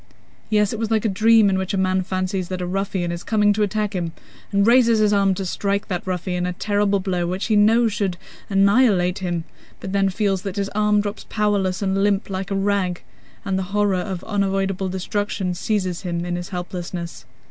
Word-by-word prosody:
Yes, 210 Hz, -1 st, +2 dB
it 225 Hz, -, -4 dB
was 225 Hz, -1 st, -1 dB
like 225 Hz, -1 st, +1 dB
a -, -, +4 dB
dream 220 Hz, +2 st, +5 dB
in 190 Hz, -1 st, +1 dB
which 190 Hz, +1 st, -2 dB
a -, -, -1 dB
man 185 Hz, 0 st, +1 dB
fancies 185 Hz, 0 st, -2 dB
that 185 Hz, 0 st, -4 dB
a 180 Hz, -, -2 dB
ruffian 190 Hz, -1 st, -2 dB
is 170 Hz, 0 st, -5 dB
coming 210 Hz, -2 st, +3 dB
to 215 Hz, -, -2 dB
attack 210 Hz, 0 st, 0 dB
him, 170 Hz, -3 st, -3 dB, 0.4 s
and 200 Hz, 0 st, +3 dB
raises 235 Hz, -1 st, +5 dB
his 210 Hz, -1 st, +3 dB
arm 195 Hz, -1 st, +3 dB
to 195 Hz, -, -4 dB
strike 200 Hz, +2 st, -2 dB
that 180 Hz, 0 st, -3 dB
ruffian 180 Hz, 0 st, -2 dB
a 180 Hz, -, -2 dB
terrible 205 Hz, +1 st, +1 dB
blow 180 Hz, -2 st, -1 dB
which 185 Hz, +3 st, -2 dB
he 220 Hz, -, +1 dB
knows 220 Hz, +2 st, +4 dB
should 190 Hz, -4 st, -1 dB, 0.3 s
annihilate 195 Hz, -2 st, +3 dB
him, 175 Hz, -3 st, -2 dB, 0.4 s
but 190 Hz, -, -6 dB
then 195 Hz, 0 st, +2 dB
feels 195 Hz, -1 st, 0 dB
that 195 Hz, -1 st, -5 dB
his 200 Hz, -1 st, -1 dB
arm 210 Hz, 0 st, +2 dB
drops 205 Hz, +1 st, -6 dB
powerless 205 Hz, -3 st, 0 dB
and 195 Hz, 0 st, +1 dB
limp 200 Hz, -1 st, +1 dB
like 190 Hz, 0 st, -3 dB
a 195 Hz, -, -1 dB
rag, 195 Hz, -3 st, 0 dB, 0.4 s
and 190 Hz, -2 st, 0 dB
the 190 Hz, +2 st, -4 dB
horror 205 Hz, -1 st, +3 dB
of 185 Hz, -1 st, -5 dB
unavoidable 195 Hz, -2 st, -1 dB
destruction 190 Hz, 0 st, -2 dB
seizes 185 Hz, -2 st, -2 dB
him 175 Hz, -2 st, -3 dB
in 175 Hz, 0 st, -2 dB
his 175 Hz, 0 st, -5 dB
helplessness. 175 Hz, -1 st, -6 dB
195 Hz, 205 wpm, -22 LUFS, 185-205 Hz, 0.4 s, dream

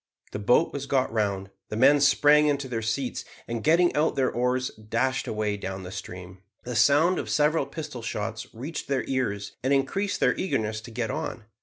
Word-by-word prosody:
The -, -, -4 dB
boat 120 Hz, +10 st, +3 dB
was 140 Hz, 0 st, -4 dB
got 130 Hz, -4 st, +1 dB
round, 100 Hz, -3 st, -1 dB, 0.2 s
the -, -, -4 dB
men 140 Hz, +5 st, +5 dB
sprang 145 Hz, +2 st, +5 dB
into 140 Hz, -2 st, 0 dB
their 115 Hz, -3 st, -3 dB
seats, 120 Hz, +4 st, -2 dB, 0.2 s
and, 115 Hz, -1 st, -4 dB
getting 170 Hz, +3 st, +4 dB
out 155 Hz, +2 st, +2 dB
their 130 Hz, -2 st, +1 dB
oars, 125 Hz, +1 st, 0 dB
dashed 115 Hz, +5 st, -2 dB
away 105 Hz, -1 st, -1 dB
down 95 Hz, -1 st, -5 dB
the 90 Hz, -, -8 dB
stream. 90 Hz, 0 st, -8 dB, 0.2 s
The 125 Hz, 0 st, -5 dB
sound 145 Hz, -, +4 dB
of -, -, -5 dB
several 150 Hz, -1 st, +2 dB
pistol 150 Hz, -4 st, -7 dB
shots 115 Hz, 0 st, -4 dB
reached 140 Hz, +7 st, -6 dB
their 135 Hz, -2 st, 0 dB
ears 110 Hz, -7 st, -2 dB
and 130 Hz, -, +1 dB
increased 195 Hz, +9 st, 0 dB
their -, -, +3 dB
eagerness 110 Hz, -, -2 dB
to 115 Hz, -, -11 dB
get 115 Hz, +1 st, -2 dB
on. 145 Hz, -6 st, -5 dB
125 Hz, 190 wpm, -26 LUFS, 110-145 Hz, 0.2 s, men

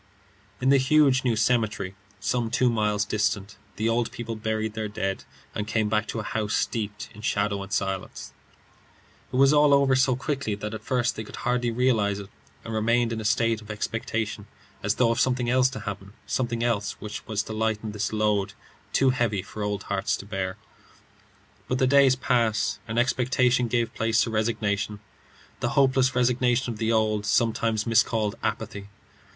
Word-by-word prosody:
III. -, -, -10 dB
In -, -, +5 dB
the 140 Hz, -, +6 dB
huge 135 Hz, -1 st, +4 dB
new 120 Hz, -3 st, +2 dB
cemetery, 110 Hz, -4 st, 0 dB, 0.3 s
some 115 Hz, +4 st, -1 dB
two 125 Hz, +1 st, +2 dB
miles 105 Hz, -2 st, +1 dB
distant, 105 Hz, -1 st, -1 dB, 0.2 s
the 110 Hz, -, -1 dB
old 115 Hz, 0 st, +1 dB
people 115 Hz, -1 st, -5 dB
buried 110 Hz, 0 st, -2 dB
their 110 Hz, -1 st, -3 dB
dead, 95 Hz, -2 st, -3 dB, 0.3 s
and 105 Hz, -, -3 dB
came 110 Hz, -1 st, 0 dB
back 105 Hz, 0 st, +1 dB
to 115 Hz, -, -3 dB
a -, -, -3 dB
house 105 Hz, 0 st, -2 dB
steeped 105 Hz, -2 st, -2 dB
in 105 Hz, -, -12 dB
shadow 100 Hz, -2 st, 0 dB
and 100 Hz, 0 st, -8 dB
silence. 95 Hz, -2 st, -3 dB, 1.0 s
It -, -, -5 dB
was 135 Hz, +2 st, +5 dB
all 145 Hz, -1 st, +6 dB
over 140 Hz, -1 st, +3 dB
so 130 Hz, -1 st, +3 dB
quickly 135 Hz, -5 st, -2 dB
that 105 Hz, +1 st, -5 dB
at 110 Hz, -, -5 dB
first 125 Hz, 0 st, 0 dB
they 110 Hz, -, -5 dB
could -, -, -10 dB
hardly 125 Hz, -1 st, +1 dB
realize 115 Hz, -4 st, +1 dB
it, 100 Hz, 0 st, -9 dB, 0.3 s
and 115 Hz, -, -5 dB
remained 115 Hz, +2 st, +2 dB
in 110 Hz, -, -3 dB
a -, -, -6 dB
state 115 Hz, +1 st, +1 dB
of 105 Hz, -, -14 dB
expectation 110 Hz, -1 st, -3 dB, 0.3 s
as 105 Hz, +2 st, 0 dB
though 120 Hz, -2 st, +3 dB
of 115 Hz, -, -1 dB
something 125 Hz, -2 st, +1 dB
else 130 Hz, 0 st, +4 dB
to 135 Hz, -, -7 dB
happen 100 Hz, -1 st, -6 dB
something 120 Hz, -2 st, -1 dB
else 105 Hz, -4 st, 0 dB
which 105 Hz, 0 st, -7 dB
was 105 Hz, -1 st, -1 dB
to 110 Hz, -, -7 dB
lighten 110 Hz, 0 st, -1 dB
this 105 Hz, -1 st, -2 dB
load, 105 Hz, -2 st, +1 dB, 0.4 s
too 135 Hz, -1 st, +4 dB
heavy 115 Hz, -7 st, 0 dB
for 105 Hz, -, -8 dB
old 105 Hz, -1 st, -2 dB
hearts 100 Hz, 0 st, -1 dB
to -, -, -9 dB
bear. 95 Hz, -1 st, -3 dB, 1.1 s
But 130 Hz, -, 0 dB
the 130 Hz, -, +3 dB
days 135 Hz, -1 st, +5 dB
passed, 120 Hz, -4 st, +1 dB
and 115 Hz, +1 st, -4 dB
expectation 125 Hz, 0 st, +2 dB
gave 120 Hz, 0 st, 0 dB
place 115 Hz, 0 st, +2 dB
to 115 Hz, -, -3 dB
resignation 105 Hz, -2 st, -1 dB, 0.6 s
the -, -, 0 dB
hopeless 130 Hz, -1 st, +3 dB
resignation 125 Hz, 0 st, +2 dB
of 105 Hz, -, -11 dB
the 115 Hz, 0 st, +1 dB
old, 110 Hz, -2 st, +1 dB
sometimes 110 Hz, 0 st, +1 dB
miscalled, 110 Hz, -2 st, +2 dB
apathy. 100 Hz, 0 st, -3 dB
110 Hz, 180 wpm, -26 LUFS, 105-125 Hz, 1.1 s, the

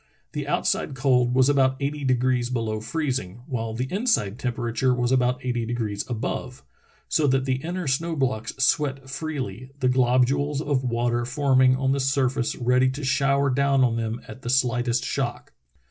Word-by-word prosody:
The -, -, -4 dB
outside -, -, 0 dB
cold 125 Hz, -2 st, +2 dB
was 130 Hz, 0 st, +5 dB
about 135 Hz, -2 st, +3 dB
eighty 145 Hz, +1 st, -3 dB
degrees 125 Hz, -1 st, +1 dB
below 115 Hz, -3 st, -2 dB
freezing, 120 Hz, -, -3 dB
while 115 Hz, -4 st, -3 dB
the 125 Hz, +2 st, -1 dB
inside 195 Hz, -, 0 dB
temperature 125 Hz, +1 st, 0 dB
was 120 Hz, 0 st, 0 dB
about 125 Hz, 0 st, +1 dB
eighty 120 Hz, -2 st, -1 dB
degrees 110 Hz, -3 st, -2 dB
above, 110 Hz, -, -4 dB, 0.4 s
so 150 Hz, -, +2 dB
that 130 Hz, 0 st, +2 dB
the 130 Hz, -1 st, 0 dB
inner 175 Hz, +6 st, -4 dB
snow 160 Hz, +5 st, 0 dB
blocks 125 Hz, -6 st, -1 dB
sweat 135 Hz, 0 st, +1 dB
freely, 135 Hz, -5 st, -5 dB
the 130 Hz, -2 st, +2 dB
glob 125 Hz, 0 st, +4 dB
ules 140 Hz, +2 st, -1 dB
of 145 Hz, -3 st, 0 dB
water 120 Hz, 0 st, 0 dB
forming 130 Hz, 0 st, +3 dB
on 135 Hz, 0 st, 0 dB
the 140 Hz, -, +1 dB
surface 135 Hz, -2 st, 0 dB
ready 125 Hz, +1 st, +2 dB
to 140 Hz, +3 st, -5 dB
shower 140 Hz, +1 st, +2 dB
down 140 Hz, 0 st, +3 dB
on 120 Hz, -2 st, +2 dB
them 115 Hz, 0 st, -2 dB
at 130 Hz, -, -10 dB
the 120 Hz, -, -5 dB
slightest 125 Hz, -1 st, +1 dB
shock. -, -, -3 dB
130 Hz, 170 wpm, -24 LUFS, 120-135 Hz, 0.4 s, was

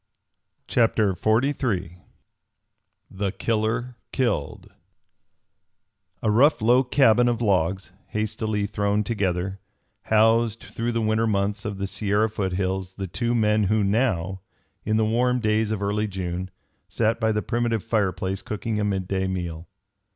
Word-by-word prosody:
CHAPTER 110 Hz, -4 st, +2 dB
XLIII 110 Hz, -, 0 dB, 1.1 s
THE 95 Hz, 0 st, -2 dB
KILLER 115 Hz, +4 st, -1 dB
KILLED 115 Hz, -, -2 dB, 1.5 s
A 110 Hz, -, +2 dB
rough 140 Hz, +8 st, +4 dB
low 120 Hz, +4 st, +4 dB
cabin 125 Hz, -2 st, +4 dB
of 120 Hz, -2 st, +1 dB
logs, 95 Hz, -3 st, 0 dB, 0.2 s
hastily 110 Hz, -1 st, -2 dB
thrown 105 Hz, 0 st, 0 dB
together, 95 Hz, -3 st, -2 dB, 0.5 s
housed 115 Hz, +1 st, +3 dB
through 120 Hz, +1 st, -3 dB
the 115 Hz, -1 st, 0 dB
winter 110 Hz, +1 st, +1 dB
months 100 Hz, 0 st, -1 dB
of 105 Hz, -2 st, -3 dB
the 100 Hz, -, -2 dB
Sierra 100 Hz, +2 st, 0 dB
foothills 95 Hz, -1 st, -2 dB
the 95 Hz, 0 st, -5 dB
two 115 Hz, +7 st, -1 dB
men 105 Hz, -2 st, +2 dB
who 105 Hz, +2 st, +2 dB
now, 95 Hz, -4 st, 0 dB, 0.4 s
in 110 Hz, +1 st, +1 dB
the 110 Hz, -, +2 dB
warm 125 Hz, +3 st, +2 dB
days 110 Hz, -1 st, +1 dB
of 105 Hz, -2 st, -2 dB
early 105 Hz, +2 st, 0 dB
June, 95 Hz, -1 st, -4 dB, 0.4 s
sat 115 Hz, 0 st, 0 dB
by 110 Hz, -2 st, +2 dB
the 105 Hz, 0 st, -1 dB
primitive 120 Hz, -3 st, -1 dB
fireplace 95 Hz, -3 st, -1 dB
cooking 110 Hz, +1 st, -3 dB
a -, -, 0 dB
midday 95 Hz, -1 st, -1 dB
meal. 85 Hz, -3 st, -4 dB
105 Hz, 130 wpm, -24 LUFS, 95-115 Hz, 1.5 s, rough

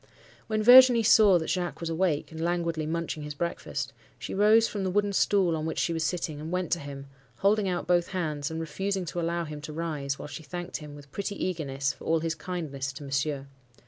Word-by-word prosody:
"When 215 Hz, -1 st, 0 dB
Virginie 245 Hz, 0 st, +9 dB
saw 210 Hz, -3 st, +6 dB
that 160 Hz, -, -2 dB
Jacques 180 Hz, -1 st, -2 dB
was 170 Hz, -1 st, -3 dB
awake, 165 Hz, -3 st, 0 dB
and 160 Hz, 0 st, -7 dB
languidly 170 Hz, -2 st, -1 dB
munching 165 Hz, -1 st, -3 dB
his 150 Hz, 0 st, -6 dB
breakfast, 170 Hz, +3 st, -3 dB, 0.2 s
she -, -, -6 dB
rose 215 Hz, +3 st, +5 dB
from 205 Hz, -2 st, -4 dB
the 190 Hz, -, 0 dB
wooden 205 Hz, +1 st, +1 dB
stool 190 Hz, -4 st, +3 dB
on 155 Hz, 0 st, -3 dB
which 160 Hz, -, -4 dB
she 170 Hz, -, +1 dB
was 160 Hz, -1 st, -1 dB
sitting, 160 Hz, -3 st, -2 dB
and 160 Hz, +2 st, -6 dB
went 180 Hz, -1 st, -2 dB
to 170 Hz, -, +2 dB
him, 140 Hz, -1 st, -8 dB, 0.3 s
holding 200 Hz, -, +2 dB
out 175 Hz, -1 st, -2 dB
both 175 Hz, -1 st, +2 dB
hands, 155 Hz, -6 st, -2 dB
and 160 Hz, 0 st, -4 dB
refusing 190 Hz, +4 st, -2 dB
to 170 Hz, +2 st, -3 dB
allow 170 Hz, +1 st, -1 dB
him 150 Hz, -2 st, -7 dB
to 155 Hz, -, -7 dB
rise, 150 Hz, -4 st, -3 dB
while -, -, -7 dB
she 150 Hz, -, -8 dB
thanked 175 Hz, +4 st, -5 dB
him 150 Hz, -2 st, -10 dB
with 145 Hz, -1 st, -14 dB
pretty 200 Hz, 0 st, -3 dB
eagerness 140 Hz, -8 st, -2 dB
for -, -, -14 dB
all 160 Hz, 0 st, +2 dB
his 165 Hz, 0 st, -1 dB
kindness 155 Hz, -6 st, -4 dB
to 135 Hz, -, -9 dB
Monsieur. 140 Hz, 0 st, -2 dB
165 Hz, 220 wpm, -28 LUFS, 150-185 Hz, 0.3 s, Virginie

